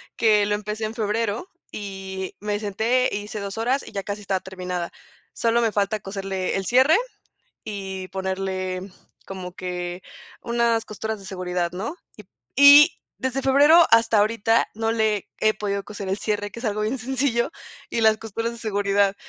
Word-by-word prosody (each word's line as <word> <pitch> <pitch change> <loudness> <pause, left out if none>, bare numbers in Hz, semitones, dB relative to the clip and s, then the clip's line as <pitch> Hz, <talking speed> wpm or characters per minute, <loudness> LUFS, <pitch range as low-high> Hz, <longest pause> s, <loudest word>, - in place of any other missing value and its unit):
que 210 -2 +4
lo 205 0 +1
empecé 210 +1 -4
en 215 - -4
febrero, 225 - -1 0.2
y 190 -2 -6
me 210 0 -2
senté, 225 +5 +1
hice 210 +1 -4
2 200 +1 -5
horas 255 +5 +1
y - - -10
ya 195 - -4
casi 205 +2 -5
estaba 195 -2 -1
terminada. 180 -2 -5 0.4
Solo 235 +1 +2
me 225 - +2
falta 205 +1 0
coserle 195 -1 -3
el 195 0 -2
cierre 260 - +5 0.7
y 190 -2 -5
ponerle 190 -1 -3 0.5
como 185 -2 -7
que 180 -1 -5 0.4
unas 235 -1 +1
costuras 220 +1 -4
de 195 - -12
seguridad, 180 -2 -2
¿no? 215 - -4 0.6
Y 285 +1 +10 0.4
y - - -10
desde 260 +1 0
febrero 290 +6 +6
hasta 230 -1 +5
ahorita 225 +2 +2
no 225 +1 -1
le 220 -3 0
he 215 0 +4
podido 200 -1 -2
coser 205 -2 -7
el 190 +2 -1
cierre, 205 -1 -2
que 235 - -8
es - - -10
algo 215 -1 -1
bien 230 +5 -1
sencillo, 255 +1 0 0.4
y 230 - -1
las 220 -1 +5
costuras 225 +1 -4
de 235 - -10
seguridad. 200 -2 +1
210 Hz, 170 wpm, -24 LUFS, 195-230 Hz, 0.7 s, Y